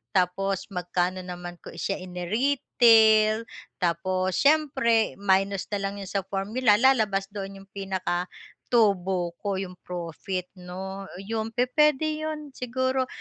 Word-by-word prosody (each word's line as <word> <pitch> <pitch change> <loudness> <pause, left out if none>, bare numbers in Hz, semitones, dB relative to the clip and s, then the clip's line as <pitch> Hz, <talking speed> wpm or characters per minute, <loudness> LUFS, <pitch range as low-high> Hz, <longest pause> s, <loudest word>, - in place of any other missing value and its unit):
tapos 190 +1 0
magkano 180 +1 -1
naman 175 -1 -7
ko - - -9
siya 195 - -2
ini-retail 220 +2 +4 0.4
tapos 185 +1 0
siyempre 280 -7 +3
minus 195 -1 +1
na 205 - 0
lang 195 +1 -2
'yon 195 - -7
sa 200 - +1
formula, 210 +4 +2
lalabas 220 -7 +3
doon 195 -1 -6
'yong 195 - -24
pinaka-tubo 190 0 -1
ko, 200 -1 -2
yung 185 -2 -6
profit 180 +1 -4
'no? 190 +2 -7 0.2
Yung 225 0 -2
pupuwede 300 +4 +2
'yon 305 -2 -6
siguro. 260 +1 -1
195 Hz, 120 wpm, -26 LUFS, 185-235 Hz, 0.4 s, ini-retail